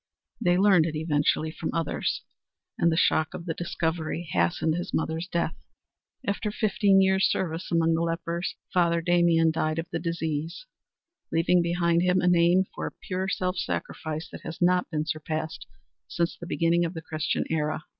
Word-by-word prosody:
They 175 0 +4
learned 190 -4 +5
it 160 - -4
eventually 155 0 +1
from 160 - -4
others, 165 -2 -1 0.5
and 170 - +2
the 160 - 0
shock 160 -2 +2
of 170 - -7
the 165 - -2
discovery 165 0 -2
hastened 90 - +1
his 175 +3 -3
mother's 160 +2 -2
death. 170 -3 -1 0.7
After 210 0 -1
fifteen 200 -2 +3
years' 190 0 +3
service 170 -1 -2
among 165 -1 +3
the 165 - +1
lepers 170 +1 -2 0.2
Father 170 -2 +3
Damien 170 -1 +3
died 155 0 -1
of 165 - -2
the 165 - -2
disease, 165 - -3 0.7
leaving 175 +2 +3
behind 170 0 +2
him 180 +1 +3
a 180 - +1
name 175 +2 +4
for - - -4
pure 185 0 -3
self 185 -1 -1
sacrifice 155 -3 -3
that - - -9
has 165 - -7
not 180 0 +2
been 155 -2 -2
surpassed 155 0 -4 0.4
since 170 0 -1
the 170 - -9
beginning 170 -1 +2
of 170 +1 -3
the 160 - -6
Christian 155 -1 -1
era. 155 -1 -1
170 Hz, 165 wpm, -27 LUFS, 160-180 Hz, 0.7 s, learned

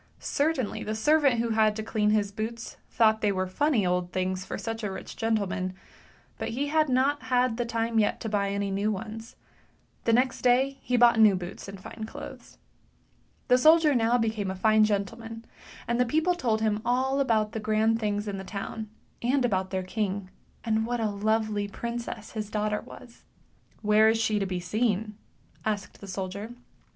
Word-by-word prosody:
Certainly 285 -6 -1
the 215 - -3
servant 280 0 +3
who 230 0 0
had 220 -1 +3
to 220 - -4
clean 215 -1 0
his 210 -1 +1
boots 225 +2 -5
thought 220 -1 +3
they 210 - +2
were 185 -1 -1
funny 230 +3 +1
old 180 0 0
things 185 0 -1
for - - -5
such 225 0 -5
a 205 - -1
rich 190 - -7
gentleman, 200 -5 -1 0.6
but - - -2
he 280 +5 -2
had 310 -1 +2
not 270 +3 +2
had 250 -2 +1
time 230 0 0
yet 210 - +1
to - - -3
buy 205 -2 0
any 200 0 -2
new 200 +2 0
ones; 220 +2 -6 0.7
the 230 - +3
next 250 +2 +2
day 260 +2 +3
he 250 - 0
bought 235 -1 +6
new 215 -3 +7
boots 180 +1 -7
and 195 -1 -8
fine 220 +3 -7
clothes. - - -10 0.9
The 250 - +5
soldier 315 +1 +6
now 235 -1 +3
became 220 -4 -1
a 190 - -3
fine 215 +3 +4
gentleman, 225 +2 -3 0.4
and 235 +1 0
the 250 - +4
people 320 +7 +2
told 235 -10 0
him 215 -1 +1
all 260 +3 +1
about 220 -5 +2
the 220 - -4
grand 220 +1 +2
things 210 -1 -1
in 195 -1 -3
the - - -6
town, 210 +2 -6 0.3
and 255 +2 +2
about 190 -5 0
their 185 -1 -2
king, 195 -1 -3 0.3
and 220 -1 +1
what 240 +1 -2
a 220 -2 0
lovely 215 0 0
princess 235 0 -5
his 215 -2 -4
daughter 210 0 -1
was. 235 -2 -14 0.3
" - - -34
Where 215 +1 +5
is 225 0 +2
she 215 -2 +1
to 195 - -1
be 185 -1 -2
seen? 210 +2 -1 0.2
" - - -32
asked 210 -2 -3
the 200 - -9
soldier. 200 +4 -5
220 Hz, 190 wpm, -27 LUFS, 205-235 Hz, 0.9 s, new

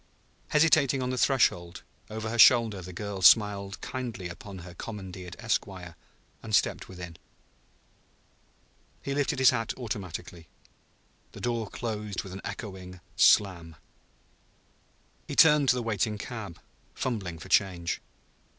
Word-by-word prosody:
Hesitating 140 -4 +3
on 125 - -2
the 130 - -3
threshold, 90 -11 +1 0.3
over 110 0 -4
her 120 - -3
shoulder 115 -5 +6
the 90 +1 -9
girl 100 +1 -6
smiled 100 -1 +4
kindly 120 -8 -5
upon 95 +3 -9
her 90 - -10
commandeered 95 -3 -8
esquire; 95 -7 -3 0.5
and 110 -2 -1
stepped - - 0
within. 90 -3 -9 1.9
He 140 - -3
lifted 140 -1 0
his 130 -1 +6
hat 115 -3 -2
automatically. 90 -7 -6 0.9
The - - -10
door 115 -3 -2
closed 105 -4 -4
with 95 - -9
an 95 - -7
echoing 95 -4 -7 0.2
slam. 85 -6 +3 1.5
He - - -5
turned 150 -4 +6
to 125 - +5
the 125 - -2
waiting 110 -1 -1
cab, 100 -6 -7 0.4
fumbling 100 -10 -3
for 80 - -11
change. 90 -3 +1
105 Hz, 125 wpm, -28 LUFS, 90-120 Hz, 1.9 s, shoulder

